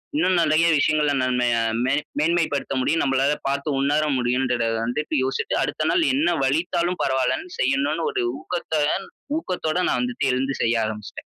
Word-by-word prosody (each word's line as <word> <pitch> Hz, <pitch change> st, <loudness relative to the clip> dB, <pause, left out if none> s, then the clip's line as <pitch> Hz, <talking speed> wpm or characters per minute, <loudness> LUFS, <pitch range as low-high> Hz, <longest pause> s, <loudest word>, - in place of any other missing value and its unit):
இன்னும் 185 Hz, -, +2 dB
நிறைய 160 Hz, +1 st, +3 dB
விஷயங்கள 150 Hz, 0 st, +2 dB
நம்ம 125 Hz, -1 st, +1 dB
ய 115 Hz, -, +2 dB, 0.3 s
மே 130 Hz, -, +1 dB, 0.3 s
மேன்மைப்படுத்த 155 Hz, -3 st, 0 dB
முடியும். 165 Hz, +5 st, +1 dB
நம்பளால 135 Hz, +1 st, +2 dB
பாத்து 140 Hz, +2 st, -1 dB
உணர 145 Hz, +2 st, +2 dB
முடியும்ன்றத 125 Hz, -1 st, 0 dB, 0.2 s
வந்துட்டு 150 Hz, +7 st, -3 dB
யோசிட்டு, 130 Hz, +1 st, -2 dB
அடுத்த -, -, -2 dB
நாள் 365 Hz, -2 st, +2 dB
என்ன 290 Hz, +5 st, +2 dB
வலித்தாலும் 170 Hz, +5 st, 0 dB
பரவால்லன்னு, 130 Hz, -, -1 dB
செய்யணுன்னு 140 Hz, +5 st, +1 dB
ஒரு -, -, -1 dB, 0.2 s
ஊக்கத்துடன் 160 Hz, +1 st, -1 dB, 0.3 s
ஊக்கதோட 180 Hz, -, -2 dB
நான் -, -, +1 dB
வந்துட்டு 245 Hz, 0 st, -1 dB
எழுந்து 135 Hz, +2 st, -1 dB
செய்ய 115 Hz, 0 st, +2 dB
ஆரம்பிச்சுட்டேன். 105 Hz, -1 st, -7 dB
145 Hz, 150 wpm, -23 LUFS, 130-170 Hz, 0.3 s, நிறைய